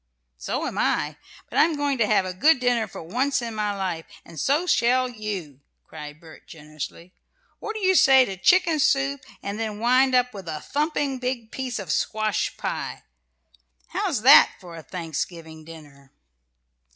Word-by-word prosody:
"So -, -, -3 dB
am -, -, -4 dB
I. 150 Hz, 0 st, 0 dB, 0.3 s
But -, -, -1 dB
I'm 315 Hz, 0 st, +4 dB
going 285 Hz, -3 st, -1 dB
to 215 Hz, -, +3 dB
have 205 Hz, -3 st, +2 dB
a 185 Hz, -, -4 dB
good 285 Hz, -, +4 dB
dinner 245 Hz, -3 st, +1 dB
for 180 Hz, -, -9 dB
once 255 Hz, +11 st, 0 dB
in 235 Hz, -2 st, -5 dB
my 210 Hz, -2 st, -2 dB
life, 180 Hz, -4 st, -3 dB, 0.2 s
and 165 Hz, -3 st, -10 dB
so 290 Hz, -, +1 dB
shall 255 Hz, -5 st, +2 dB
you!" 205 Hz, -, -6 dB, 0.3 s
cried 150 Hz, -1 st, -10 dB
Bert, 160 Hz, -1 st, -16 dB
generously. 155 Hz, +3 st, -9 dB, 0.5 s
"What 440 Hz, -, -5 dB
do 435 Hz, -, -5 dB
you 375 Hz, -1 st, +3 dB
say 265 Hz, -6 st, +6 dB
to 195 Hz, -, -5 dB
chicken 335 Hz, -, +3 dB
soup, 275 Hz, 0 st, +1 dB, 0.2 s
and 200 Hz, +2 st, -4 dB
then 215 Hz, -2 st, -3 dB
wind 255 Hz, +3 st, +3 dB
up 250 Hz, 0 st, +2 dB
with 195 Hz, -4 st, -9 dB
a 155 Hz, -2 st, -4 dB
thumping 290 Hz, -, -2 dB
big 250 Hz, -3 st, -4 dB
piece 260 Hz, -2 st, -4 dB
of 190 Hz, -7 st, -5 dB
squash 215 Hz, -1 st, -1 dB
pie? -, -, -4 dB, 0.9 s
How's -, -, -2 dB
that -, -, +8 dB
for 175 Hz, -2 st, -11 dB
a 165 Hz, -, -8 dB
Thanksgiving 160 Hz, -1 st, -6 dB
dinner?" 145 Hz, -4 st, -14 dB
215 Hz, 170 wpm, -24 LUFS, 165-265 Hz, 0.9 s, that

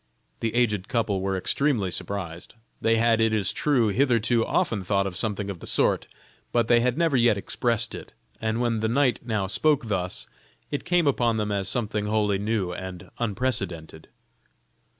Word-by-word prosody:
The 115 Hz, 0 st, -2 dB
aged 105 Hz, -6 st, +1 dB
couple 110 Hz, -6 st, 0 dB
were 95 Hz, 0 st, -1 dB
extremely 110 Hz, -2 st, +1 dB
surprised. 90 Hz, -1 st, -5 dB, 0.3 s
They 115 Hz, 0 st, +3 dB
had, 115 Hz, 0 st, +3 dB
it 110 Hz, -1 st, +3 dB
is 100 Hz, -4 st, +1 dB
true, 130 Hz, -7 st, +2 dB
hitherto 120 Hz, -1 st, +2 dB
often 105 Hz, -3 st, 0 dB
thought 100 Hz, +1 st, +1 dB
of 95 Hz, -2 st, -4 dB
something 105 Hz, +1 st, -2 dB
of 100 Hz, -4 st, -5 dB
the -, -, -9 dB
sort, -, -, +1 dB, 0.4 s
but 120 Hz, -2 st, +2 dB
they 120 Hz, 0 st, +5 dB
had 125 Hz, +2 st, +1 dB
never 165 Hz, -4 st, +2 dB
yet 120 Hz, -4 st, +4 dB
expressed 115 Hz, +2 st, -1 dB
it, -, -, -8 dB, 0.3 s
and 110 Hz, +1 st, -1 dB
when 120 Hz, -2 st, 0 dB
the 110 Hz, -, 0 dB
knight 130 Hz, +1 st, +2 dB
now 110 Hz, -5 st, -1 dB
spoke 120 Hz, +6 st, +1 dB
thus, 90 Hz, -3 st, -2 dB, 0.5 s
it 145 Hz, -, -3 dB
came 175 Hz, -2 st, +2 dB
upon 120 Hz, -5 st, +2 dB
them 105 Hz, -1 st, -1 dB
as 100 Hz, -1 st, -1 dB
something 105 Hz, -3 st, -1 dB
wholly 105 Hz, -2 st, +1 dB
new 100 Hz, -4 st, -1 dB
and 90 Hz, 0 st, -8 dB
unprecedented. 95 Hz, -9 st, -3 dB
110 Hz, 170 wpm, -25 LUFS, 100-120 Hz, 0.5 s, they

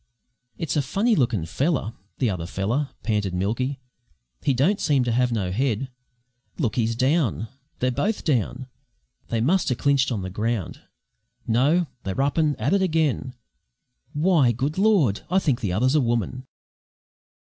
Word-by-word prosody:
"It's 165 Hz, -2 st, -2 dB
a 150 Hz, -, +3 dB
funny 205 Hz, -, +1 dB
lookin' 120 Hz, -, +1 dB
feller, 120 Hz, -, -1 dB, 0.2 s
the 130 Hz, -, +1 dB
other 90 Hz, -5 st, -2 dB
feller," 115 Hz, +11 st, -1 dB
panted 105 Hz, -5 st, -1 dB
Milky. 120 Hz, +9 st, -1 dB, 0.6 s
"He -, -, +1 dB
don't 175 Hz, +11 st, +2 dB
seem 140 Hz, -4 st, +2 dB
to 120 Hz, -, -1 dB
have 125 Hz, +1 st, +2 dB
no 100 Hz, -6 st, -1 dB
head. 130 Hz, +3 st, -1 dB, 0.7 s
Look! 130 Hz, -7 st, -1 dB
he's 115 Hz, -2 st, 0 dB
down 130 Hz, -, +1 dB, 0.3 s
they're 130 Hz, 0 st, 0 dB
both 205 Hz, -, -1 dB
down! 130 Hz, -, -1 dB, 0.6 s
They 115 Hz, -1 st, -1 dB
must 175 Hz, +10 st, +2 dB
ha' 125 Hz, -, 0 dB
clinched 140 Hz, -1 st, +2 dB
on 105 Hz, -5 st, -2 dB
the 95 Hz, -, -5 dB
ground. 105 Hz, -2 st, -2 dB, 0.6 s
No! 140 Hz, +10 st, +3 dB, 0.2 s
they're 95 Hz, +3 st, -4 dB
up 140 Hz, +3 st, +1 dB
an' 150 Hz, -2 st, +2 dB
at 130 Hz, -, 0 dB
it 200 Hz, -, +3 dB
again.... 155 Hz, -7 st, 0 dB, 0.8 s
Why, 150 Hz, -5 st, +3 dB
good 135 Hz, -, -2 dB
Lord! 190 Hz, -, +3 dB
I 185 Hz, -, +2 dB
think 140 Hz, -9 st, +1 dB
the 100 Hz, -6 st, -1 dB
other's 125 Hz, +8 st, +2 dB
a 155 Hz, -, +4 dB
woman!" 120 Hz, +2 st, -1 dB
130 Hz, 155 wpm, -24 LUFS, 115-150 Hz, 0.8 s, a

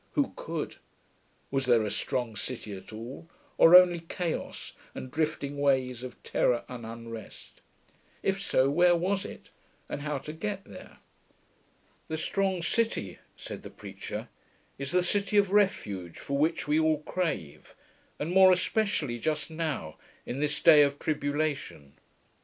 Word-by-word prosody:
Who -, -, +1 dB
could? -, -, -4 dB, 0.7 s
Was 135 Hz, -1 st, 0 dB
there 120 Hz, -3 st, +5 dB
a 105 Hz, -, -2 dB
strong 120 Hz, -4 st, -2 dB
city 110 Hz, -1 st, -5 dB
at 95 Hz, +2 st, -11 dB
all, 120 Hz, +9 st, -8 dB, 0.3 s
or 165 Hz, +2 st, +9 dB
only 180 Hz, -1 st, +8 dB
chaos 165 Hz, 0 st, -4 dB, 0.2 s
and 130 Hz, -, -7 dB
drifting 150 Hz, -2 st, -2 dB
ways 130 Hz, -3 st, +1 dB
of 125 Hz, -1 st, -9 dB
terror 120 Hz, -1 st, +1 dB
and 120 Hz, -3 st, -7 dB
unrest? 115 Hz, -1 st, -9 dB, 0.6 s
If 195 Hz, 0 st, 0 dB
so, 135 Hz, -9 st, +2 dB
where 175 Hz, +5 st, +5 dB
was 190 Hz, +3 st, 0 dB
it, -, -, -10 dB, 0.4 s
and -, -, -5 dB
how 150 Hz, 0 st, -2 dB
to 150 Hz, +3 st, -7 dB
get 195 Hz, +4 st, -4 dB
there? -, -, -12 dB, 1.1 s
The 160 Hz, -, -3 dB
strong 190 Hz, +2 st, 0 dB
city, 225 Hz, -, 0 dB, 0.2 s
said -, -, -8 dB
the -, -, -9 dB
preacher, -, -, -7 dB, 0.5 s
is 140 Hz, 0 st, -3 dB
the 180 Hz, 0 st, +3 dB
city 200 Hz, +3 st, +1 dB
of 200 Hz, -2 st, +4 dB
refuge 100 Hz, -, +1 dB
for 140 Hz, -, -4 dB
which 155 Hz, +3 st, +1 dB
we 150 Hz, +1 st, +3 dB
all 155 Hz, -1 st, +2 dB
crave, 150 Hz, -, -3 dB, 0.4 s
and 155 Hz, +4 st, -3 dB
more 190 Hz, 0 st, +8 dB
especially 180 Hz, -, +1 dB
just 155 Hz, +4 st, -1 dB
now, 155 Hz, -, -3 dB, 0.3 s
in 130 Hz, -, -4 dB
this 150 Hz, 0 st, 0 dB
day 155 Hz, -3 st, +8 dB
of 140 Hz, 0 st, +3 dB
tribulation. 145 Hz, -, -2 dB
150 Hz, 145 wpm, -29 LUFS, 125-175 Hz, 1.1 s, or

